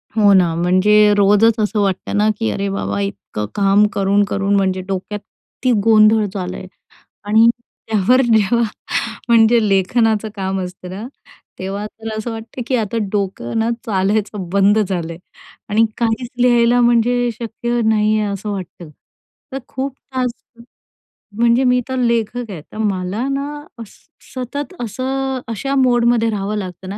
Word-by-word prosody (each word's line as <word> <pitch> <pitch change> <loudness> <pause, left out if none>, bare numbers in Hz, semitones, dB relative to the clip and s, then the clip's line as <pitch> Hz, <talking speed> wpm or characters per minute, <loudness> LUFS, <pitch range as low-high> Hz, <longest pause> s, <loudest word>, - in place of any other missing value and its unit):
हो 205 -2 +5
ना, 175 -3 +4
म्हणजे 205 +4 +4
रोजच 210 +3 +4
असं 210 0 0
वाटतं 195 +1 -1
ना, 210 +1 +3
की 225 - 0
अरे 200 0 -2
बाबा! 100 - -3
इतकं 100 +1 -4
काम 200 +1 +4
करून, 200 +1 +2
करून 200 0 0
म्हणजे 190 -1 +1
डोक्यात 195 +2 -4
किती 250 +5 -5
गोंधळ 215 -1 +5
झाला 185 -2 -4
आहे. 185 - -9 0.6
आणि 220 +2 +5 0.4
त्यावर 220 +4 +3
जेव्हा 230 0 +3 0.7
म्हणजे 230 -1 +5
लेखनाचं 215 +3 +1
काम 190 -1 -2
असतं 180 0 -8
ना, 200 +6 -6 0.5
तेव्हा 195 +2 -4
तर 225 +1 -9
असं 225 +2 -4
वाटतं 225 +3 -7
की 260 - +1
आता 230 -1 -1
डोकं 195 - -2
ना 225 +1 +1 0.2
चालायचं 200 -2 -1
बंद 200 +2 +3
झालं 180 -5 -2
आहे. 165 - -12 0.5
आणि 220 +2 +3
काहीच 235 +1 -1
लिहायला 240 0 +4
म्हणजे 240 +1 +2
शक्य 240 +1 -2
नाही 215 -1 +2
आहे, 210 -1 -1
असं 200 +2 -5
वाटतं. 180 -4 -7 0.6
तर 265 - -4
खूप 265 +1 -4 0.2
तास 250 -2 0 1.1
म्हणजे 235 +2 +3
मी 250 0 +3
तर 260 - -3
लेखक 235 -1 -1
आहे, 170 -5 -7
तर - - -10
मला 205 +3 -2
ना 275 +1 -2 0.3
अस 225 -3 -10 0.4
सतत 275 +7 -5
असं 265 +3 -3
अशा 230 +5 -3
मोडमध्ये 240 -3 +3
राहावं 210 0 -2
लागतं 185 -1 -6
ना 200 - -5
215 Hz, 150 wpm, -18 LUFS, 195-235 Hz, 1.1 s, हो